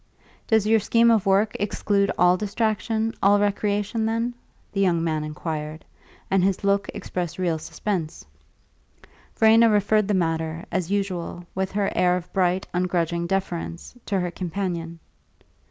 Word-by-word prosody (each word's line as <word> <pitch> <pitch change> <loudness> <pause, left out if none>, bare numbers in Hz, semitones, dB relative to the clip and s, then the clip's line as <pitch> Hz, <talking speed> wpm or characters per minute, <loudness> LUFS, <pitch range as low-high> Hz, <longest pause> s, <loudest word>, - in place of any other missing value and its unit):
"Does 220 -2 +3
your 220 +1 +4
scheme 230 +3 +4
of 215 -4 +2
work 200 +2 +3
exclude 200 -1 0
all 180 0 +5
distraction, 220 +2 -1
all 205 +1 +5
recreation, 205 +2 0
then?" 230 +2 -1 0.4
the 195 - -1
young 170 -4 +2
man 155 -2 -1
inquired; 155 0 -5 0.5
and 190 -1 +3
his 195 0 0
look 200 0 +1
expressed 180 -4 -4
real 175 -4 0
suspense. 170 -1 -4 1.1
Verena 225 +1 +6
referred 210 0 +2
the 210 - +1
matter, 165 -1 -1
as 185 -3 -1
usual, 185 -3 -3
with 190 0 -2
her 200 -1 0
air 180 0 +3
of 180 0 -9
bright, 185 0 +1
ungrudging 170 -1 0
deference, 175 -2 -3
to 195 -2 0
her 180 -1 -2
companion. 170 -2 -4
190 Hz, 140 wpm, -24 LUFS, 175-205 Hz, 1.1 s, Verena